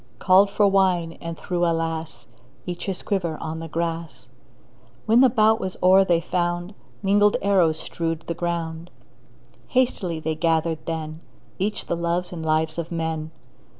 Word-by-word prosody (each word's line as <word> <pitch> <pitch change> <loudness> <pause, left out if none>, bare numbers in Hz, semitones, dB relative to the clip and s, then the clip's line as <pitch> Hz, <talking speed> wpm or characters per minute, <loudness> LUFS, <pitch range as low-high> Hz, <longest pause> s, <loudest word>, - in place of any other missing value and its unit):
Called 190 +7 +5
for 205 0 +3
wine, 185 -4 +2
and 165 -1 -5
threw 175 -1 -2
— - - +3
alas! 165 -1 -2 0.2
— 130 +3 -31
Each 175 +1 -5
his 190 -2 -3
quiver 175 -6 -1
on 160 0 -5
the 165 - -6
grass. 165 -5 -4 0.8
When 230 +3 +5
the 265 - +7
bout 220 -1 +3
was 190 -3 -4
o'er 190 +1 +7
they 175 -3 +2
found 175 +2 -2 0.3
Mingled 205 +1 +4
arrows 180 -6 +3
strewed 165 -1 -3
the 170 - -2
ground. 170 0 -3 0.8
Hastily 205 -10 0
they 160 0 -2
gathered 160 0 0
then 160 -1 -4 0.4
Each 210 +3 -1
the - - -1
loves 170 +1 -1
and 165 -2 -6
lives 155 +1 +1
of 170 0 -5
men. 160 -2 -3
170 Hz, 160 wpm, -23 LUFS, 160-190 Hz, 0.8 s, the